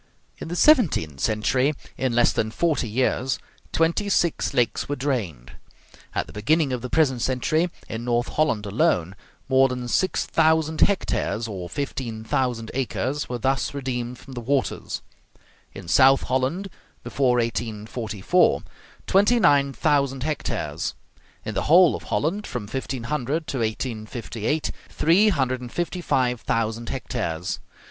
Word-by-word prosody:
In - - -6
the 175 - -4
seventeenth 175 - +4
century, 125 - +1 0.2
in 130 -2 -1
less 120 - +4
than 110 - 0
forty 145 0 0
years, 130 +3 0 0.3
twenty 170 +6 +1
six 175 -4 +1
lakes 125 -1 0
were 145 - 0
drained. 105 - -3 0.6
At - - 0
the - - -13
beginning 140 +7 +1
of 125 - -2
the 125 - -5
present 135 -6 +2
century, 155 +8 +1 0.2
in 115 +1 -5
North 120 0 0
Holland 115 -9 0
alone, 100 - +1 0.3
more 135 0 +5
than 125 -1 -4
six 185 +10 +1
thousand 160 -1 +2
hectares 120 - +1
(or 95 -5 -6
fifteen 130 -6 -4
thousand 115 -1 -1
acres) 135 +2 -2
were 125 - -2
thus 135 +4 0
redeemed 125 -3 -3
from 135 +2 -12
the 120 - -5
waters; 135 +3 -1 0.7
in - - -10
South 135 +9 +5
Holland, 135 +10 -1 0.3
before 130 -3 +1
1844, 115 - 0 0.4
twenty 205 +5 +4
nine 140 -6 +4
thousand 140 -3 +1
hectares; 85 - -3 0.5
in - - -3
the - - -1
whole 175 +1 +7
of - - -8
Holland, 195 +8 -1
from 125 -4 -4
1500 135 +6 -3
to 135 - -3
1858, 115 +3 -2 0.2
three 185 +7 +4
hundred 130 -8 0
and 120 -1 -8
fifty 175 +1 -3
five 125 -7 +1
thousand 115 0 -1
hectares. 90 -9 -3
130 Hz, 140 wpm, -24 LUFS, 115-150 Hz, 0.7 s, whole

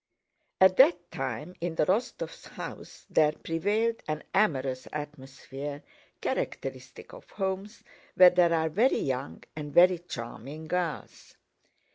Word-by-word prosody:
At 190 0 +6
that 175 0 +5
time 135 +2 -4
in 170 -1 -2
the - - +2
Rostóvs' 205 +9 -2
house - - -9
there 150 -1 +3
prevailed 210 +9 -1
an 155 0 -3
amorous 135 -10 +1
atmosphere 145 -1 -7 0.4
characteristic - - -4
of - - -13
homes 195 +2 -4 0.3
where 180 -1 +9
there 175 -1 +4
are 160 -1 +2
very 220 - +3
young 135 0 -3
and 150 -1 -6
very 180 +3 +6
charming 140 0 -8
girls. 175 -1 -4
165 Hz, 120 wpm, -28 LUFS, 145-185 Hz, 0.4 s, where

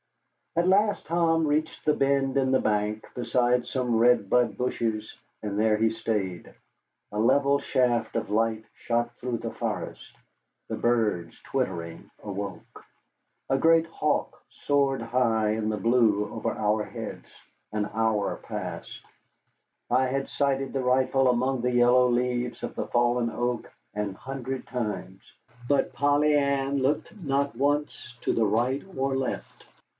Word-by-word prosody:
At 170 +2 +2
last 205 +2 +3
Tom 165 -1 +2
reached 155 +2 -1
the 150 - +4
bend 135 -1 +1
in 135 -1 +2
the 130 - +4
bank, 105 0 0
beside 125 0 +1
some 125 -3 0
red 115 -3 +4
bud 125 -2 +2
bushes, 115 -3 -2 0.3
and 105 -1 -3
there 110 0 +3
he 110 0 +2
stayed. 105 -6 -3 0.6
A 105 - -3
level 140 +4 +3
shaft 120 -5 +1
of - - -2
light 110 0 +1
shot 120 0 -1
through 125 -1 -3
the - - -5
forest. - - -5 0.5
The - - -3
birds, 110 -8 0
twittering, 85 -11 -3
awoke. 100 -2 -7 0.7
A 135 - +3
great 165 +2 +5
hawk 150 -2 -2
soared 140 -3 0
high 115 -3 +1
in 110 0 -1
the 105 - -1
blue 110 -4 +3
over - - -2
our 105 0 0
heads. - - -8 0.4
An 105 -1 -1
hour 110 -2 0
passed. - - -6 0.9
I 130 +2 +3
had 135 +1 -2
sighted 135 -1 0
the 135 -1 -1
rifle 130 +1 +3
among 125 +1 +1
the 125 +1 +1
yellow 125 +1 +5
leaves 125 0 -1
of - - -4
the - - -3
fallen 120 0 +2
oak 120 +1 -2 0.2
an 105 -2 -3
hundred 135 +1 -5
times. 105 -6 -4 0.5
But 140 -1 +2
Polly 145 +1 +3
Ann 140 -1 +1
looked 135 +10 0
not 140 -2 0
once 140 -3 -1
to - - 0
the 115 - +2
right 120 +6 +1
or 135 0 0
left. 135 -1 -4
125 Hz, 145 wpm, -27 LUFS, 110-135 Hz, 0.9 s, great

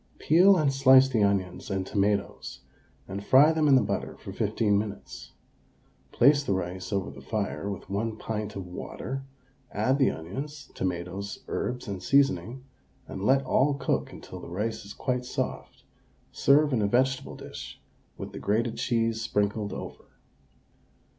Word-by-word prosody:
Peel 185 +5 +5
and 145 -4 +2
slice 135 -1 +7
the 120 -5 0
onions 95 -3 -1
and 95 -2 -1
tomatoes 100 -8 -1 0.5
and 100 +1 -5
fry 135 +8 +6
them 160 -1 +2
in 140 - +6
the 130 - +4
butter - - -3
for - - -9
15 105 -3 +1
minutes; 100 0 -5 0.8
place 140 +3 +5
the 100 - 0
rice 90 0 -4
over 100 -1 -1
the - - -12
fire 100 -2 -3
with 100 -3 -6
1 110 +3 -2
pint 105 -1 -4
of 95 -2 -5
water; 125 +8 -6 0.5
add 130 +7 +1
the 135 - +4
onions, 135 - -7
tomatoes, 95 +3 -4
herbs, 125 0 -3
and 100 -2 -5
seasoning, 130 -3 +2 0.4
and - - -7
let 135 +4 +3
all 140 +2 +2
cook 135 - -1
until - - -10
the - - -10
rice 110 +5 -3
is 100 - -9
quite 125 -1 -1
soft; 125 - -5 0.5
serve 145 +1 +4
in 115 - +2
a 100 - +2
vegetable 130 +4 +1
dish - - -9 0.4
with - - -7
the - - -7
grated 110 +3 0
cheese 115 -2 0
sprinkled 105 -2 -1
over. - - -8
110 Hz, 155 wpm, -27 LUFS, 100-135 Hz, 0.8 s, slice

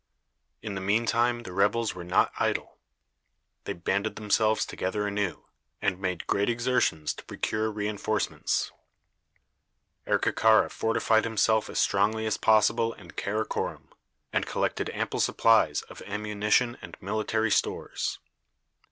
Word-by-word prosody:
In 105 -2 -4
the 95 - -4
mean 105 +5 +1
time 120 +1 +1
the 90 - -8
rebels 105 +4 +1
were 90 - -8
not 90 - +2
idle. - - -1 0.9
They - - -2
banded 100 +4 -1
themselves 110 0 +2
together 105 +3 -2
anew, 100 -2 -2 0.3
and 100 -3 -1
made 90 -2 -3
great 100 +2 +1
exertions 120 -10 +1
to - - -11
procure 110 +1 -2
re 105 -1 -3
enforcements. 105 +1 -1 1.4
Erkekara 110 0 +3
fortified 110 0 +2
himself 110 -1 +2
as - - -5
strongly 105 +3 +2
as 110 - 0
possible 110 +1 +3
in 85 -4 -14
Karakorom, 105 +2 -3 0.4
and - - 0
collected - - -1
ample - - -3
supplies 115 -1 +3
of - - -12
ammunition 105 +3 0
and - - -10
military 110 +2 -1
stores. - - -1
105 Hz, 125 wpm, -27 LUFS, 100-110 Hz, 1.4 s, Erkekara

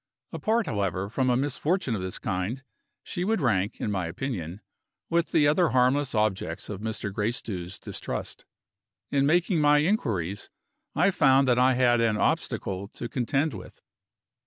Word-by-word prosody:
Apart, 225 +1 0
however, 100 -2 -2
from 130 +1 +1
a 120 - +3
misfortune 145 +3 0
of 105 - -2
this 95 0 -3
kind, 105 +7 -3 0.4
she 175 - -4
would 220 +3 +1
rank, 105 - 0
in 105 - -2
my 90 -4 -1
opinion, 90 - -5 0.5
with 170 0 +1
the 145 - +4
other 160 +3 +3
harmless 130 +2 +2
objects 95 -5 -1
of 105 -2 -5
Mr. 110 -2 -4
Gracedieu's 105 -4 -3
distrust. - - -6 0.7
In 140 -1 +2
making 175 +2 +2
my 150 0 +5
inquiries, 110 - -1 0.5
I 175 +7 +4
found 135 -5 +4
that 125 -1 +3
I 130 0 +4
had 120 -2 +3
an 110 -2 +2
obstacle 95 -1 -1
to 120 - -7
contend 135 +5 0
with. - - -11
125 Hz, 155 wpm, -27 LUFS, 100-145 Hz, 0.7 s, my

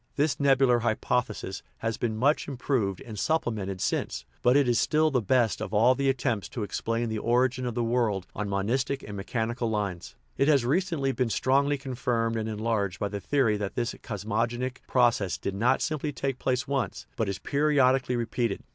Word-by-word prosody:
This 145 +1 +2
tt - - -18
nebular 135 -3 +4
hypothe 115 0 0
sis 95 +1 -6
" - - -39
has 115 -1 -1
been 110 -2 -2
much 140 +6 +2
improved 125 -8 -1
and 110 -3 -7
supplemented 105 -12 -1
since, 60 -9 -2 0.2
but 125 +3 +5
it 140 -3 +3
is 120 -1 +3
still 155 0 +2
the 125 -3 +2
best 115 +1 +2
of 100 +3 -3
all 120 +5 +5
the 135 +1 0
attempts 120 -6 -1
to 115 - -4
explain 115 +3 -2
the 110 -1 -2
origin 125 +2 +1
of 120 - -4
the 120 - 0
world 115 -5 0
on 105 0 -3
monistic 125 +8 -1
and 105 - -7
mechanical 115 +4 -2
lines. 100 -5 -3 0.2
It 140 - +3
has 140 -5 +4
recently 155 -1 +1
been 125 -2 0
strongly 140 +5 +2
confirmed 120 -4 -1
and 110 0 -2
enlarged 105 -4 -1
by 100 - -1
the 100 0 -4
theory 125 -6 +2
that 100 -1 -4
this 120 -1 -1
cosmogonic 115 +4 -2
process 120 -7 +2
did 100 - -4
not 115 +6 +2
simply 150 0 -2
take 135 -1 -3
place 130 +1 0
once, 135 -2 -2
but 110 -3 -1
is 100 - -2
periodically 135 0 +2
repeated. 115 -2 -1
120 Hz, 190 wpm, -27 LUFS, 105-135 Hz, 0.2 s, but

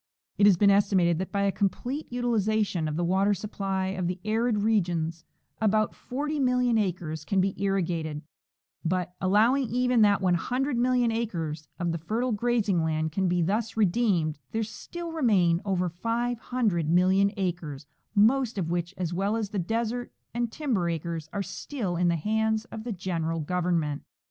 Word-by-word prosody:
It 205 - +7
has 195 -4 +6
been 200 +2 +5
estimated 190 -4 +3
that 190 - -4
by 200 -1 0
a 200 - +2
complete 245 - -2
utilization 215 -7 0
of 150 - -3
the 175 - -1
water 195 +4 +2
supply 195 -1 -2
of 185 -2 -2
the 180 +1 -3
arid 220 -1 +1
regions 170 -6 0 0.4
about 215 0 +2
40,000,000 250 -4 0
acres 170 -6 -2
can 195 +4 0
be 190 +1 +2
irrigated; 170 -6 -1 0.6
but, 180 +1 -1
allowing 225 +7 +3
even 250 0 +2
that 205 -1 +5
100,000,000 245 +6 +1
acres 165 -10 -3
of 175 -2 -1
the 165 - -3
fer 215 +9 -2
tile 255 0 0
grazing 215 -5 +1
land 160 0 -1
can 190 +3 0
be 175 -1 +2
thus 220 +6 -1
redeemed, 185 -7 +2
there 225 0 0
still 335 +10 -7
remain 195 - +3
over 185 -2 0
500,000,000 200 -3 +1
acres, 165 -7 -3 0.3
most 230 +3 +3
of 170 -3 -1
which, 175 +2 -2
as 175 -2 -2
well 195 +4 0
as 220 -3 -2
the 205 - -1
desert 230 +6 -2 0.2
and 240 -1 -1
timber 230 - -1
acres, 165 -1 -4
are 200 - -2
still 195 0 -4
in 175 +1 +2
the 170 - +3
hands 220 +5 0
of 220 0 -7
the 240 - -3
general 165 -4 -2
Government. 165 -2 -1
195 Hz, 160 wpm, -27 LUFS, 175-225 Hz, 0.6 s, It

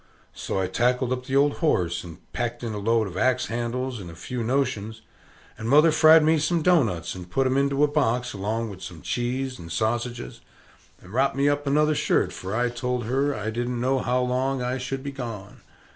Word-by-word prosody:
So - - -3
I 95 - +1
tackled 125 +6 +1
up 125 0 -5
the 135 - -1
old 145 +1 +3
horse, 90 - +1
and 85 -3 -10 0.2
packed 120 0 -3
in 115 -2 -3
a 105 - -4
load 115 +2 +2
of 95 -2 -7
axe 130 +1 +2
handles, 120 +2 -3
and 90 -3 -8
a 85 - -10
few 120 +8 -5
notions; 115 -4 -1 0.6
and 110 +1 -3
mother 150 +4 +6
fried 160 0 +7
me 160 +1 +3
some 165 +2 0
doughnuts, 120 - +2
and 90 -1 -9
put 135 +9 +1
'em 130 0 +1
into 140 +1 +2
a - - +6
box, 125 -5 0
along 110 +3 -2
with 95 -1 -11
some 85 -4 -9
cheese, 125 +2 -2
and 85 -1 -9
sausages, 120 +5 -2 0.6
and 90 +3 -13
ropped 135 +2 +2
me 140 +1 +2
up 145 0 0
another 150 +2 +3
shirt, - - +1
for 95 +3 -5
I 120 +1 +1
told 125 0 -2
her 135 +4 0
I 110 +1 -3
didn't 120 +1 -2
know 130 +2 +1
how 125 0 0
long 130 +2 0
I 125 +1 -2
should 130 +1 -4
be 140 - -4
gone. 115 -7 -7
125 Hz, 210 wpm, -25 LUFS, 110-135 Hz, 0.6 s, fried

